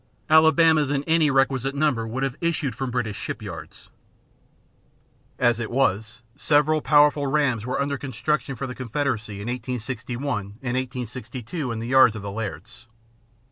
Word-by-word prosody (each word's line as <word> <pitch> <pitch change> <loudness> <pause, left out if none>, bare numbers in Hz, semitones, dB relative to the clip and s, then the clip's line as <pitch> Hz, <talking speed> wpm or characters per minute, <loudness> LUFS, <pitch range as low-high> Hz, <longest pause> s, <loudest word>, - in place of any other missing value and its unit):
Alabamas 160 -1 +5
in 140 -1 0
any 160 -1 +3
requisite 135 0 +1
number 135 -6 +1
would 130 +4 -3
have 135 -2 -1
issued 165 -6 0
from 130 +3 -4
British 120 -4 -2
shipyards. - - -7 1.5
As 120 -1 +2
it 115 - -3
was, 115 -2 0
several 150 +1 +2
powerful 145 -1 +4
rams 135 -6 +1
were 125 - -1
under 140 -1 -1
construction 135 +1 -2
for 135 - -4
the 125 - -5
Confederacy 125 -4 -2
in 100 - -7
1861 125 0 -3 0.2
and 125 -1 -2
1862 125 - -4
in 115 - -3
the 115 - -4
yards 130 -3 +5
of 105 - -7
the 100 - -5
Lairds. 115 +3 -7
130 Hz, 145 wpm, -24 LUFS, 115-145 Hz, 1.5 s, Alabamas